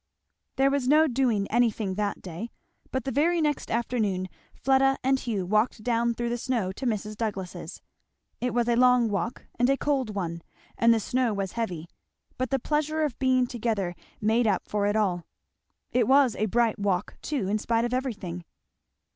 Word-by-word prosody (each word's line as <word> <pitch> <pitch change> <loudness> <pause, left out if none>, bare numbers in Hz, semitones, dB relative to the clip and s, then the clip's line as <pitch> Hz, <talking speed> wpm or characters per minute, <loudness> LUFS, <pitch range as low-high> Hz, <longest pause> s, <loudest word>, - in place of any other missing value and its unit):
There 270 +1 +3
was 275 -3 0
no 305 +3 +6
doing 245 -7 +1
anything 225 -4 +1
that 205 +1 -2
day, 185 +6 -6 0.4
but 260 -2 -2
the 270 - -3
very 335 +6 +2
next 300 -3 0
afternoon 215 -6 -1 0.3
Fleda 270 0 +3
and 265 +1 +2
Hugh 210 -8 -2
walked 215 +3 +1
down 235 0 +1
through 240 0 -2
the 240 0 -2
snow 230 -7 -1
to 255 +7 -4
Mrs. 215 -1 -2
Douglass's. 190 -6 -5 0.6
It 250 0 -1
was 240 0 +1
a 240 - +3
long 250 -1 +5
walk 205 +3 -3
and 245 +1 +4
a 275 - +3
cold 265 -8 -1
one 170 -3 -3 0.3
and 230 0 +4
the 230 - +4
snow 245 0 0
was 195 -1 -2
heavy; 180 -8 -4 0.5
but 255 - -1
the 270 - +2
pleasure 305 +3 0
of 290 -6 -2
being 255 -1 +3
together 220 -7 -2 0.3
made 225 +2 +2
up 195 -4 0
for 205 -1 0
it 205 - +1
all. 185 -5 0 0.6
It 250 - +2
was 265 -3 +5
a 215 - 0
bright 225 0 +1
walk, 200 -2 -1
too, 270 -11 -2
in 210 +2 0
spite 230 +1 +1
of 240 - -3
everything. 205 -10 -3
235 Hz, 180 wpm, -27 LUFS, 205-255 Hz, 0.6 s, no